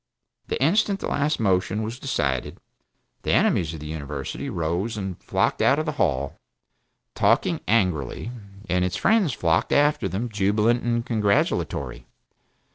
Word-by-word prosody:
The - - -2
instant 195 - +2
the - - -3
last 150 +2 0
motion 95 +1 +1
was 115 +3 -5
decided, 70 - -1 0.6
the - - 0
enemies 80 -3 +2
of - - -8
the - - -7
University 75 - -5
rose 90 +3 -2
and 95 -3 -5
flocked - - 0
out 135 - +4
of 155 - -1
the 155 - -1
Hall, 70 -5 0 0.7
talking - - +2
angrily, 90 - 0 0.4
and 90 0 +1
its 90 0 -1
friends 210 - +3
flocked 85 -7 +1
after 150 +1 +3
them 110 +6 -2
jubilant 105 +3 +2
and 120 -1 -1
congratulatory. 100 - 0
100 Hz, 140 wpm, -24 LUFS, 80-120 Hz, 0.7 s, out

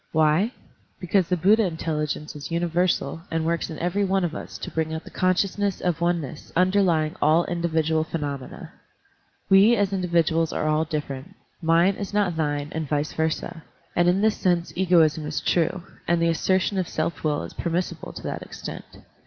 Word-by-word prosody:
Why? 160 +8 +3 0.5
Because 185 0 +1
the 180 - +2
Buddha 210 +7 +4
intelligence 155 -4 -3
is 145 - -7
universal 170 -2 0
and 165 -1 -1
works 170 0 -1
in 160 - -6
every 180 +4 0
one 195 -1 +1
of 165 - -3
us - - -7
to - - -7
bring 160 -1 -1
out 160 - -5
the - - -12
consciousness 190 +2 0
of 170 -2 -1
oneness 170 -4 -2
underlying 180 -4 +2
all 160 +3 +4
individual 160 -2 0
phenomena. 145 -5 -5 0.7
We 200 +5 +6
as 200 -2 0
individuals 170 -3 +1
are 155 - -1
all 155 +1 +2
different; 150 +3 -5 0.3
mine 170 +4 +3
is 205 0 -5
not 200 -5 +2
thine 145 -2 -1
and 160 -3 -4
vice 150 0 -1
versa; 160 +1 -2 0.3
and 175 0 +4
in 185 +2 +2
this 220 0 +2
sense 175 -3 0
egoism 165 -4 +3
is 150 - -2
true, 170 +1 0 0.2
and 170 0 +2
the 170 0 +2
assertion 185 +3 +1
of 180 - -1
self 170 - -3
will 150 -2 0
is - - -8
permis 175 +1 -1
sible 160 - -9
to - - -8
that - - -4
extent. - - -8
170 Hz, 180 wpm, -24 LUFS, 155-185 Hz, 0.7 s, We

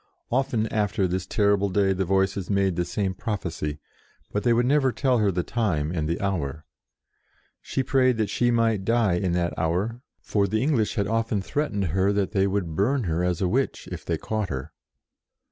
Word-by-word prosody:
Often 125 -3 +1
after 105 -2 +1
this 90 +1 -3
terrible 100 -1 +2
day 95 0 +2
the 95 0 -1
Voices 95 0 0
made 100 -3 +2
the 90 0 0
same 95 0 -1
prophecy, 85 -8 -3 0.5
but 105 - -1
they 120 - +2
would 120 +1 +3
never 135 0 +3
tell 130 -1 +1
her 105 -2 +3
the 90 -1 -1
time 85 -11 -1
and 80 -3 -2
the 85 - -1
hour. 80 -7 -2 1.0
She 135 - -2
prayed 130 -2 +3
that 110 -2 0
she 120 - +2
might 115 -4 +2
die 115 -2 +2
in 90 0 0
that 85 -1 0
hour, 95 +9 -1 0.2
for 100 -2 0
the 110 +4 0
English 130 -7 +1
had 100 - +1
often 115 0 0
threat 145 +10 -2
ened 100 -4 -1
her 95 +5 +2
that 100 -1 0
they 100 -2 +2
would 95 -5 -2
burn 125 - +1
her 85 -2 -1
as 90 -2 0
a - - +2
witch, 130 +8 -1
if - - -6
they - - -1
caught 110 -3 -3
her. 65 -2 -5
100 Hz, 195 wpm, -25 LUFS, 90-115 Hz, 1.0 s, would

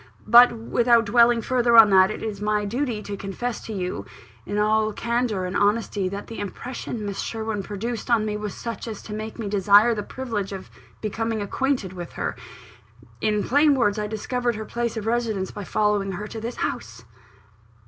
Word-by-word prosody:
But, 240 +3 +8
without 235 0 +2
dwelling 235 +1 +4
further 245 -2 +3
on 220 -2 +9
that, 190 0 +6
it 215 - -5
is 210 -2 -4
my 210 0 0
duty 235 0 -2
to 205 - -5
confess 200 +5 -4
to - - -5
you, 180 - -3 0.4
in 205 - -2
all 215 +1 +2
candour 235 -5 -1
and 180 - -4
honesty, 205 -2 +1
that 200 +1 -6
the 230 - -8
impression 220 +2 -5
Miss 200 -1 -4
Sherwin 220 -2 -3
produced 220 +4 -5
on 230 -3 +3
me 210 -1 -2
was 210 -1 -5
such 230 0 -6
as 220 -3 -7
to 210 - -8
make 215 +1 -6
me 225 -3 -4
desire 205 +3 +5
the 210 - -3
privilege 210 -4 -4
of 190 -1 -8 0.3
becoming 225 +1 -2
acquainted 215 -1 -1
with 175 -2 -8
her. - - -3 0.9
In 210 -1 +1
plain 290 +2 +4
words, 215 -5 +1
I 210 - -2
discovered 240 +3 -2
her 220 +1 -5
place 235 0 -3
of 215 - -4
residence 225 -5 -1
by 205 - -7
following 205 -2 0
her 205 +4 -5
to 220 - -7
this 235 +2 -4
house." 115 +3 -4
215 Hz, 190 wpm, -24 LUFS, 205-235 Hz, 0.9 s, on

